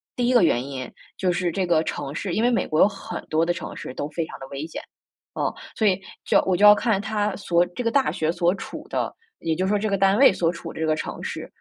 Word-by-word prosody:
第 245 Hz, -1 st, 0 dB
一 255 Hz, -, +3 dB
个 240 Hz, -, +6 dB
原 125 Hz, -6 st, +2 dB
因， 130 Hz, -2 st, -6 dB, 0.2 s
就 185 Hz, -1 st, 0 dB
是 175 Hz, 0 st, 0 dB
这 185 Hz, +2 st, -1 dB
个 165 Hz, -2 st, +3 dB
城 140 Hz, -3 st, -4 dB
市 185 Hz, +2 st, -3 dB
因 215 Hz, -, +1 dB
为 240 Hz, -, +4 dB
美 240 Hz, -, +1 dB
国 155 Hz, -, -1 dB
有 -, -, +8 dB
很 200 Hz, -1 st, -7 dB
多 160 Hz, +1 st, +2 dB
的 175 Hz, -, +1 dB
城 -, -, -7 dB
市 -, -, -7 dB
都 145 Hz, +3 st, -4 dB
非 160 Hz, +2 st, -2 dB
常 -, -, -10 dB
地 135 Hz, -, -8 dB
危 140 Hz, +2 st, -5 dB
险， 165 Hz, -, -7 dB, 0.5 s
啊， -, -, -1 dB, 0.2 s
所 220 Hz, -, +2 dB
以 190 Hz, -1 st, +2 dB, 0.2 s
就 -, -, +4 dB
我 185 Hz, -2 st, +2 dB
就 210 Hz, -, +5 dB
要 210 Hz, -, +11 dB
看 210 Hz, -1 st, +1 dB
它 210 Hz, 0 st, -1 dB
所 175 Hz, -4 st, +2 dB
这 180 Hz, +8 st, -6 dB
个 230 Hz, -, +1 dB
大 270 Hz, +1 st, +2 dB
学 160 Hz, 0 st, 0 dB
所 175 Hz, +1 st, +1 dB
处 -, -, -8 dB
的 -, -, -2 dB, 0.2 s
也 165 Hz, -, -1 dB
就 185 Hz, -, -1 dB
是 -, -, -1 dB
说 210 Hz, -, +3 dB
这 210 Hz, +2 st, -1 dB
个 200 Hz, -, +1 dB
单 195 Hz, +1 st, +3 dB
位 270 Hz, -4 st, +7 dB
所 170 Hz, -2 st, +1 dB
处 170 Hz, -1 st, -8 dB
的 -, -, -9 dB
这 160 Hz, -, 0 dB
个 155 Hz, -, +2 dB
城 155 Hz, -, -5 dB
市， -, -, -5 dB
180 Hz, 305 characters per minute, -24 LUFS, 160-205 Hz, 0.5 s, 要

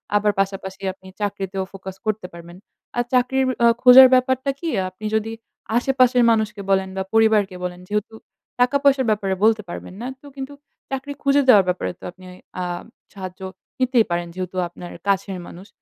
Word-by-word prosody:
আবার 205 Hz, 0 st, +3 dB
পাশাপাশি 195 Hz, 0 st, -2 dB
আপনি 190 Hz, 0 st, -18 dB
চাকরিতেও 195 Hz, -1 st, -2 dB
ফোকাস 190 Hz, -1 st, -8 dB
করতে 215 Hz, -3 st, -2 dB
পারবেন। 170 Hz, +1 st, -11 dB, 0.4 s
আর 240 Hz, -, +2 dB
চাকরির 260 Hz, +1 st, +2 dB, 0.2 s
অ -, -, +8 dB, 0.2 s
খোঁজার 255 Hz, +1 st, +10 dB
ব্যাপারটা 260 Hz, +1 st, +2 dB
কি? 335 Hz, -, -3 dB, 0.2 s
আপনি 185 Hz, +4 st, -11 dB
যদি 220 Hz, +1 st, -1 dB, 0.5 s
আশেপাশের 250 Hz, -1 st, +3 dB
মানুষকে 215 Hz, -2 st, 0 dB
বলেন 190 Hz, -1 st, +2 dB
বা 190 Hz, -, 0 dB
পরিবারকে 215 Hz, -4 st, +3 dB
বলেন 180 Hz, 0 st, -4 dB
যেহেতু 210 Hz, +1 st, -2 dB, 0.5 s
টাকা-পয়সার 275 Hz, +1 st, +3 dB
ব্যাপারে 200 Hz, -3 st, 0 dB
বলতে 220 Hz, -1 st, +4 dB
পারবেন 185 Hz, -, -8 dB
না, 245 Hz, -, -4 dB
তো -, -, -18 dB
কিন্তু 270 Hz, +1 st, -6 dB, 0.4 s
চাকরি 270 Hz, +2 st, -4 dB
খুঁজে 280 Hz, +1 st, +4 dB
দেওয়ার 205 Hz, -6 st, +7 dB
ব্যাপারে 180 Hz, 0 st, -1 dB
তো -, -, -20 dB
আপনি 185 Hz, +1 st, -17 dB, 0.4 s
আ -, -, -1 dB, 0.5 s
সাহায্য 185 Hz, -1 st, -8 dB, 0.4 s
নিতেই 255 Hz, -3 st, +3 dB
পারেন 175 Hz, 0 st, -1 dB
যেহেতু 185 Hz, 0 st, -5 dB
আপনার 175 Hz, 0 st, -10 dB, 0.2 s
কাছের 195 Hz, -1 st, 0 dB
মানুষ। 185 Hz, +3 st, -12 dB
210 Hz, 165 wpm, -22 LUFS, 190-255 Hz, 0.5 s, খোঁজার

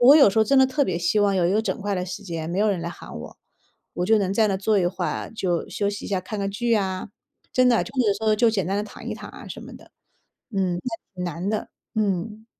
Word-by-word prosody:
我 245 Hz, -, +6 dB
我 295 Hz, -, +10 dB
有 275 Hz, -10 st, +7 dB
时 210 Hz, -, 0 dB
候 220 Hz, -, +6 dB
真 275 Hz, +3 st, +4 dB
的 265 Hz, -, +8 dB
特 285 Hz, +3 st, +1 dB
别 170 Hz, -, -1 dB
希 175 Hz, +5 st, +2 dB
望 200 Hz, -2 st, +3 dB
有 175 Hz, -, +3 dB
一 180 Hz, -, +2 dB
个 215 Hz, -, +3 dB
整 -, -, -1 dB
块 205 Hz, 0 st, 0 dB
的 180 Hz, -1 st, -1 dB
时 185 Hz, +3 st, -6 dB
间， 165 Hz, -4 st, -4 dB
没 175 Hz, -, -2 dB
有 210 Hz, +1 st, +3 dB
人 185 Hz, -4 st, -1 dB
来 170 Hz, -, -3 dB
喊 175 Hz, -, -10 dB
我， -, -, -9 dB, 0.6 s
我 180 Hz, -, -1 dB
就 220 Hz, +1 st, +5 dB
能 195 Hz, -2 st, 0 dB
在 220 Hz, +1 st, +4 dB
那 195 Hz, -, +1 dB
儿 -, -, -3 dB
坐 210 Hz, +2 st, +2 dB
一 175 Hz, -, +2 dB
会 180 Hz, -, -1 dB
儿， -, -, -3 dB
就 180 Hz, -6 st, -1 dB
休 200 Hz, -1 st, 0 dB
息 205 Hz, 0 st, -6 dB
一 -, -, -6 dB
下， 195 Hz, -2 st, +1 dB
看 210 Hz, +3 st, -6 dB
看 195 Hz, 0 st, -1 dB
剧 235 Hz, +4 st, -1 dB
呀， 190 Hz, -4 st, 0 dB, 0.5 s
真 255 Hz, 0 st, +5 dB
的 235 Hz, -, +4 dB
就 -, -, -10 dB
是 235 Hz, -6 st, +3 dB
说 220 Hz, -1 st, +3 dB
就 230 Hz, +1 st, +4 dB
简 195 Hz, -6 st, 0 dB
单 195 Hz, -, 0 dB
地 205 Hz, -, 0 dB
躺 210 Hz, -, -10 dB
一 -, -, -2 dB
躺 -, -, -9 dB
啊 -, -, -11 dB
什 -, -, -7 dB
么 -, -, -10 dB
的。 -, -, -15 dB, 0.6 s
嗯， 190 Hz, -4 st, 0 dB
那 230 Hz, -3 st, -4 dB, 0.2 s
挺 180 Hz, -, -4 dB
难 175 Hz, +2 st, -3 dB
的， 215 Hz, -, -2 dB, 0.3 s
嗯。 210 Hz, +1 st, -1 dB
200 Hz, 315 characters per minute, -24 LUFS, 185-220 Hz, 0.6 s, 我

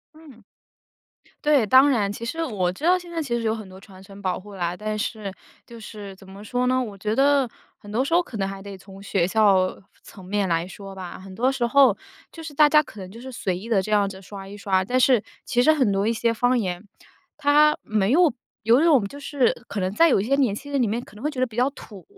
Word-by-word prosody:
嗯。 295 Hz, -7 st, -16 dB, 1.0 s
对， 295 Hz, -4 st, +4 dB
当 260 Hz, +6 st, +6 dB
然， 205 Hz, -6 st, +1 dB
其 225 Hz, +3 st, -7 dB
实 325 Hz, +8 st, -3 dB
我 195 Hz, -, -1 dB
知 190 Hz, -, -13 dB
道 360 Hz, +3 st, +4 dB
现 350 Hz, -1 st, -11 dB
在 335 Hz, -1 st, -2 dB
其 240 Hz, -6 st, -2 dB
实 235 Hz, -, -4 dB
有 220 Hz, -1 st, +1 dB
很 215 Hz, -4 st, -9 dB
多 185 Hz, 0 st, -12 dB
传 190 Hz, -1 st, -15 dB
承 195 Hz, +1 st, -13 dB
保 185 Hz, -3 st, -2 dB
护 200 Hz, +1 st, -12 dB
啦， 175 Hz, -1 st, -2 dB
但 215 Hz, +2 st, -4 dB
是， 210 Hz, -1 st, -4 dB, 0.3 s
就 235 Hz, -1 st, -13 dB
是 205 Hz, -3 st, -9 dB
怎 190 Hz, 0 st, -17 dB
么 195 Hz, +2 st, -11 dB
说 245 Hz, +4 st, -1 dB
呢？ 255 Hz, +1 st, +2 dB
我 210 Hz, -5 st, -6 dB
觉 210 Hz, +2 st, -2 dB
得 275 Hz, 0 st, +3 dB, 0.3 s
很 205 Hz, -, -13 dB
多 235 Hz, +5 st, +1 dB
时 330 Hz, +5 st, 0 dB
候 350 Hz, -, +4 dB
可 255 Hz, -, -11 dB
能 195 Hz, -1 st, -1 dB
还 195 Hz, 0 st, -8 dB
得 200 Hz, -1 st, -8 dB
从 195 Hz, +1 st, -13 dB
学 190 Hz, -3 st, 0 dB
校 195 Hz, -3 st, +2 dB, 0.2 s
层 190 Hz, -3 st, -14 dB
面 200 Hz, 0 st, -1 dB
来 165 Hz, +1 st, 0 dB
说 195 Hz, +1 st, -10 dB
吧。 185 Hz, -2 st, -8 dB
很 190 Hz, 0 st, -11 dB
多 250 Hz, +5 st, +2 dB
时 255 Hz, -3 st, -1 dB
候 275 Hz, +1 st, +5 dB, 0.4 s
就 330 Hz, -, -10 dB
是 320 Hz, -1 st, -7 dB
大 300 Hz, +1 st, +6 dB
家 300 Hz, +1 st, +5 dB
可 225 Hz, -8 st, -13 dB
能 185 Hz, -1 st, -8 dB
就 230 Hz, +3 st, -11 dB
是 260 Hz, +1 st, -8 dB
随 190 Hz, -6 st, -2 dB
意 200 Hz, +6 st, -8 dB
地 220 Hz, -4 st, +3 dB
这 215 Hz, -, -6 dB
样 205 Hz, -2 st, +3 dB
子 190 Hz, -1 st, -10 dB
刷 195 Hz, 0 st, -9 dB
一 200 Hz, +1 st, -10 dB
刷， 190 Hz, -2 st, +1 dB
但 250 Hz, +7 st, 0 dB
是 250 Hz, -4 st, +4 dB, 0.2 s
其 245 Hz, -, +1 dB
实 310 Hz, -, +5 dB
很 265 Hz, -9 st, +2 dB
多 195 Hz, +1 st, 0 dB
一 -, -, +2 dB
些 230 Hz, 0 st, 0 dB
方 245 Hz, +2 st, +2 dB
言， 180 Hz, -4 st, -3 dB, 0.5 s
它 300 Hz, +1 st, +4 dB
没 210 Hz, -2 st, 0 dB
有 335 Hz, -1 st, +4 dB, 0.3 s
有 230 Hz, +5 st, +4 dB
一 -, -, +3 dB
种 290 Hz, -10 st, +4 dB
就 285 Hz, +8 st, -11 dB
是 280 Hz, -3 st, +1 dB
可 205 Hz, -, -4 dB
能 185 Hz, 0 st, -1 dB
在 330 Hz, +9 st, +5 dB
有 255 Hz, -, +3 dB
一 -, -, -1 dB
些 275 Hz, +4 st, +2 dB
年 250 Hz, -8 st, +2 dB
轻 285 Hz, +6 st, -9 dB
人 280 Hz, -2 st, +1 dB
里 235 Hz, -, +2 dB
面 220 Hz, +3 st, -1 dB
可 -, -, -17 dB
能 215 Hz, -, -12 dB
会 300 Hz, -, 0 dB
觉 280 Hz, -4 st, -6 dB
得 255 Hz, -, +3 dB
比 230 Hz, -4 st, -12 dB
较 250 Hz, +3 st, +2 dB
土， 205 Hz, -8 st, -12 dB
220 Hz, 285 characters per minute, -23 LUFS, 195-265 Hz, 1.0 s, 当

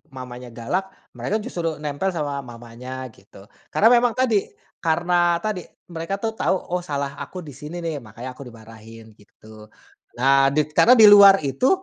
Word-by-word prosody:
mamanya 125 Hz, -2 st, -10 dB
galak. 120 Hz, +12 st, -3 dB, 0.2 s
Mereka 210 Hz, -, -3 dB
justru 165 Hz, -9 st, -4 dB
nempel 150 Hz, +5 st, -3 dB
sama 145 Hz, -3 st, -3 dB
mamanya 125 Hz, +1 st, -9 dB
gitu. 95 Hz, -1 st, -18 dB, 0.2 s
Karena 225 Hz, +4 st, +4 dB
memang 240 Hz, -1 st, +3 dB
tadi, 235 Hz, -6 st, +1 dB, 0.3 s
karena 175 Hz, +1 st, +1 dB
tadi 210 Hz, -5 st, -4 dB, 0.2 s
mereka 165 Hz, +4 st, -4 dB
tuh 220 Hz, +2 st, -3 dB
tahu, 220 Hz, -, 0 dB, 0.2 s
"Oh 180 Hz, -, 0 dB
salah 140 Hz, -5 st, -4 dB
aku 185 Hz, -2 st, -8 dB
di 145 Hz, -, -10 dB
sini 155 Hz, +6 st, -8 dB
nih, 160 Hz, -3 st, -3 dB
makanya 120 Hz, +3 st, -9 dB
aku 125 Hz, 0 st, -11 dB
dimarahin," 115 Hz, -1 st, -14 dB
gitu. 110 Hz, +1 st, -16 dB, 0.5 s
Nah, 135 Hz, +2 st, +4 dB
dit 150 Hz, +2 st, -1 dB
karena 245 Hz, +10 st, +6 dB
di 220 Hz, -, +7 dB
luar 200 Hz, -1 st, +8 dB
itu, 135 Hz, -, 0 dB
145 Hz, 160 wpm, -22 LUFS, 125-185 Hz, 0.5 s, luar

